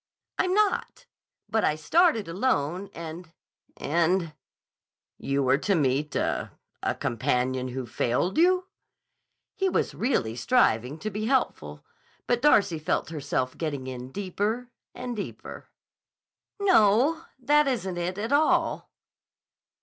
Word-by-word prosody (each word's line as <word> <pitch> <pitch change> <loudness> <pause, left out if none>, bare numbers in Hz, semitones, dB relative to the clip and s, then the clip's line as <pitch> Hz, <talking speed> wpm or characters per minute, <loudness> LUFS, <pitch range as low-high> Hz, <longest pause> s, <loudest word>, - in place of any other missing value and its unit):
"I'm 370 +1 +2
not. 425 +3 0 0.4
But 220 - 0
I 150 - +2
started 230 - +2
alone 180 - -1
and—and—" 165 0 -3 0.9
"You 140 0 0
were 130 +2 +3
to 200 +4 +1
meet 145 -1 0
a—a - - -3
companion 125 +2 -1
who 130 0 -5
failed 120 +8 -1
you?" 365 +2 +4 0.9
He 385 -2 0
was - - 0
really 125 - 0
striving 125 - +2
to 215 +6 -5
be 210 +2 -3
helpful, 265 0 -1 0.4
but 240 -1 +1
Darcy 200 - +4
felt 155 - -1
herself 140 -4 -2
getting 145 -5 -4
in 130 0 -7
deeper 205 - -3 0.2
and 245 -1 -5
deeper. 205 - -7 0.9
"No: 310 - +4 0.2
that 295 +3 +3
isn't 190 -9 -2
it, 180 +2 -3
at 220 +4 -3
all." 295 +2 +2
185 Hz, 115 wpm, -26 LUFS, -, 0.9 s, you